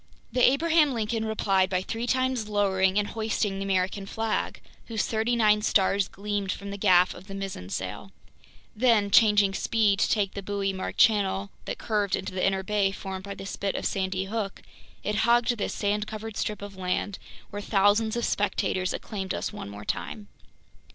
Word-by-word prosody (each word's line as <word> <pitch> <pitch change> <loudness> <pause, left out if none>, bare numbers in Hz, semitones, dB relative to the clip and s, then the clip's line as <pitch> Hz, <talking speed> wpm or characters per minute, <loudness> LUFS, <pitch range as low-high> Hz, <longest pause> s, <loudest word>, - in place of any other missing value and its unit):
The 250 - 0
Abraham 300 0 +4
Lincoln 225 0 -1
replied 195 -3 +1
by 185 -1 0
three 230 +4 -4
times 255 -4 0
lowering 195 -2 +2
and 205 0 +1
hoisting 220 -3 -1
the 195 - -3
American 195 +1 0
flag, 225 +1 -2 0.3
whose 225 -3 -1
thirty 225 +2 0
nine 210 -2 +4
stars 195 -2 +2
gleamed 205 -1 -3
from 200 +2 -6
the 200 - -5
gaff 185 -3 +4
of 185 +2 -13
the 195 - -7
mizzen 195 - -5
sail; 95 - -5 0.6
then, 220 -3 +3
changing 205 -3 +5
speed 205 -1 +2
to - - +2
take 200 -3 +1
the 200 - -5
buoy 195 0 -2
marked 190 - -5
channel 200 -2 +3
that - - -4
curved 210 -3 0
into 190 - -5
the 185 - -2
inner 195 0 +1
bay 200 0 +1
formed 190 -1 -6
by 200 0 -6
the 195 - -8
spit 195 0 -3
of - - -3
Sandy 190 0 -1
Hook, 205 -1 -4 0.4
it 210 0 -1
hugged 240 +2 +3
this - - -2
sand 210 +1 0
covered 220 0 -6
strip 210 -2 -3
of 200 -1 -8
land 190 +2 -2 0.3
where 205 - -5
thousands 205 +2 +2
of 235 - 0
spectators 185 -2 0
acclaimed 195 -3 -4
us - - -3
one 205 - -7
more 100 +1 -9
time. 210 -2 -4
205 Hz, 185 wpm, -27 LUFS, 195-220 Hz, 0.6 s, changing